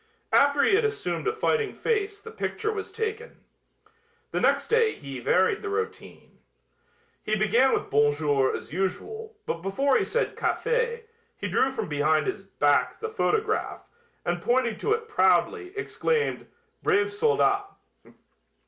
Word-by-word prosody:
After 285 0 +5
he - - +3
had 425 +4 +4
assumed 430 0 -2
a - - +3
fighting 445 0 0
face 415 -2 -1
the 450 - -11
picture 440 0 -3
was 410 - -5
taken. 450 +1 -5 0.9
The - - -1
next - - +2
day 460 -1 +3
Hy 135 -2 -8
varied 185 - +2
the 415 - -4
routine. 440 +2 -5 0.8
He 215 - -1
began 225 +6 +3
with - - -1
"Bon 145 +1 +4
jour" 145 -3 +1
as - - -8
usual, 425 - -3
but 165 - -3
before 260 +9 +2
he - - +1
said 480 - -1
"Café" 470 -1 0 0.3
he - - -4
drew 265 - +2
from 265 - -4
behind 155 +1 +1
his 390 - -3
back - - +1
the 445 - -4
photograph, 435 0 -1 0.4
and 175 0 -1
pointing 240 -3 +1
to 430 - -1
it 455 0 -3
proudly, 420 -2 +2
exclaimed, 455 +2 -1 0.3
"brave 410 -1 +2
soldat." 405 -2 +2
410 Hz, 150 wpm, -26 LUFS, -, 0.9 s, After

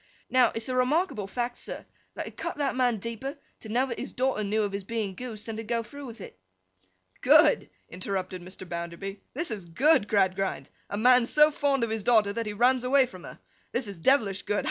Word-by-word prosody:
'Now, 255 -2 +5
it's 225 0 -2
a 255 - -2
remarkable 255 - +1
fact, 245 +3 -3
sir, - - -7 0.3
that - - -4
it - - -10
cut - - -4
that 285 -3 0
man 250 -3 +2
deeper, 230 +7 -5 0.2
to 220 - -10
know 245 +4 +2
that 235 -3 -5
his - - -5
daughter 255 -4 0
knew 210 +2 0
of 205 - -2
his 200 0 -4
being 215 -2 -3
goosed, 220 0 -7
than 225 -1 -5
to 225 - -4
go 230 +1 -1
through 280 +5 -10
with 230 -1 -10
it.' - - -11 0.8
'Good!' - - +5 0.2
interrupted 185 0 -4
Mr. 185 +1 -10
Bounderby. 170 +4 -6
'This 320 -1 -1
is 200 -5 -4
good, 215 - +3
Gradgrind! 195 -2 0 0.2
A 205 - -3
man 245 +2 +5
so 300 +2 +5
fond 280 -3 +1
of 230 - -1
his 220 -1 -1
daughter, 215 -2 +3
that 230 0 -3
he 210 - -3
runs 250 +4 +3
away 265 +1 +4
from 185 -8 -12
her! - - -10 0.4
This 240 -1 0
is 200 -4 -8
devilish 205 -3 +2
good! 205 - -1
225 Hz, 215 wpm, -27 LUFS, 200-255 Hz, 0.8 s, Now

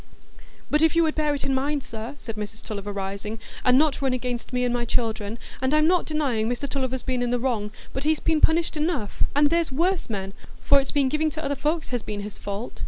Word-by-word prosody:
"But 300 - +4
if 320 +1 +4
you 335 - +5
would 315 -1 +2
bear 300 -1 +1
it 280 - -4
in 270 - +1
mind, 280 +1 0
sir," 225 +5 -6
said 225 -5 -7
Mrs 215 +1 -6
Tulliver, 205 -2 -4
rising, 200 +2 -4 0.3
"and 250 0 +5
not 300 0 +3
run 265 -2 +2
against 250 -1 -3
me 250 -1 +1
and 245 - +1
my 240 -1 0
children; 225 -2 -1 0.2
and 265 +3 +2
I'm 305 0 +5
not 355 +2 +3
denying 265 -8 0
Mr 245 +3 -2
Tulliver's 260 -2 -2
been 255 -2 -1
in 245 - +1
the 245 - +2
wrong, 235 -4 -1 0.2
but 265 - -3
he's 310 +1 +2
been 315 -2 +1
punished 330 +1 +3
enough, 300 - -1
and 290 +1 +4
there's 335 -3 +2
worse 345 +5 +1
men, 195 -2 -3 0.3
for 280 - +6
it's 270 - -3
been 280 -2 +2
giving 305 +3 +1
to 310 0 -5
other 285 +1 0
folks 310 +4 -1
has 245 -2 -1
been 210 -1 -5
his 205 0 -7
fault. 205 +4 -5
260 Hz, 240 wpm, -25 LUFS, 225-305 Hz, 0.3 s, for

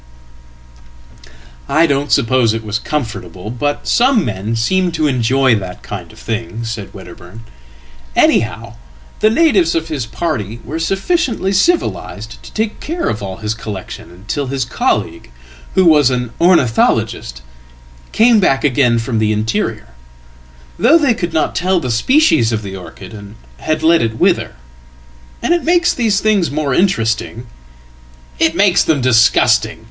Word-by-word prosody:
""I 155 +4 +4
don't 140 -1 -1
suppose 120 -3 +2
it 115 - -5
was 110 +1 -3
comfortable, 110 - -5
but 145 +4 -3
some 240 -5 +3
men 105 +1 -3
seem 180 +11 +1
to 155 -2 0
enjoy 130 -1 +2
that 95 -4 -4
kindof - - -8
thing," 115 +1 -5
said 110 -3 -6
Wedderburn. 90 +3 -12 0.7
"Anyhow, - - +1 0.4
the 215 - +4
natives 220 - +2
of 165 0 -2
his 140 -7 -4
party 120 - -4
weresufficiently 195 - -1
civilised 190 - -1
to - - -13
take 220 0 -3
care 335 +3 -3
of 105 - -3
all 95 -2 -6
his 105 - 0
collection 105 -6 -8
until 105 +11 -5
hiscolleague, 130 - -2 0.5
who 190 - +4
was 150 -5 +5
an 125 -2 -2
ornithologist, 120 - +1 0.7
came 225 0 +4
back 135 -8 +1
again 125 -4 +2
from 115 0 -2
the 110 0 +1
interior; 110 - -2 0.9
though 280 +9 +5
they 285 -7 +2
could 175 -6 -4
not 160 -1 0
tell 185 +2 +1
the 125 -6 -3
species 125 - +3
of 110 -1 -2
the 95 -1 -7
orchid, 95 +4 -11
and 100 0 -11 0.2
had 155 - -2
let 165 +1 +4
itwither. 110 -1 0 0.9
And 345 - +2
it 345 - 0
makes 345 +1 +2
these 220 -5 +1
things 210 -5 +1
more 145 -2 -2
interesting.""It 65 - -3
makes 185 -2 +3
them 155 -3 +1
disgusting. 115 -2 +3
130 Hz, 135 wpm, -16 LUFS, 110-175 Hz, 0.9 s, was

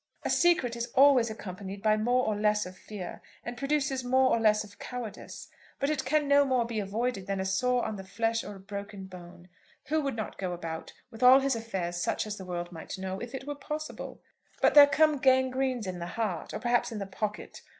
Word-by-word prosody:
"A - - -1
secret 330 -9 +3
is 235 0 -3
always 265 -4 +6
accompanied 195 -2 -7
by 215 -1 +4
more 245 +4 +2
or 215 - 0
less 210 0 +1
of 185 +1 -9
fear, 190 -2 -8 0.2
and 240 - -5
produces 275 -1 -1
more 260 +1 +3
or - - +3
less 215 -1 +3
of 205 -1 -15
cowardice. 245 -4 -7 0.3
But 280 +2 +1
it 270 -4 -2
can 295 +2 +1
no 285 0 +6
more 255 -3 +1
be 230 -2 -3
avoided 205 0 -2
than 195 -1 -1
a 190 - -1
sore 245 +6 +1
on 215 - -3
the 190 - -7
flesh 225 +3 -1
or 205 - -8
a - - -11
broken 200 0 -7
bone. 175 -1 -12 0.4
Who 315 +1 +2
would 275 -4 -2
not 220 -2 -5
go 185 -2 -2
about, 165 -2 -6 0.2
with 225 0 -11
all 255 +2 +8
his 270 -2 +1
affairs 190 -7 -3
such 175 - -1
as 210 -1 -5
the 190 - -8
world 175 -1 -4
might 165 +2 -7
know, 190 0 -4
if 240 +2 -6
it 265 - -6
were 290 - -3
possible? 300 +2 -6 0.4
But - - +4
there 290 -1 +10
come 295 +1 +3
gangrenes 260 -2 +2
in 185 -1 -5
the 170 - -4
heart, 210 -3 -3
or - - -3
perhaps 240 0 +1
in 225 - -5
the 200 - -3
pocket. 210 +2 -5
225 Hz, 225 wpm, -29 LUFS, 195-260 Hz, 0.4 s, there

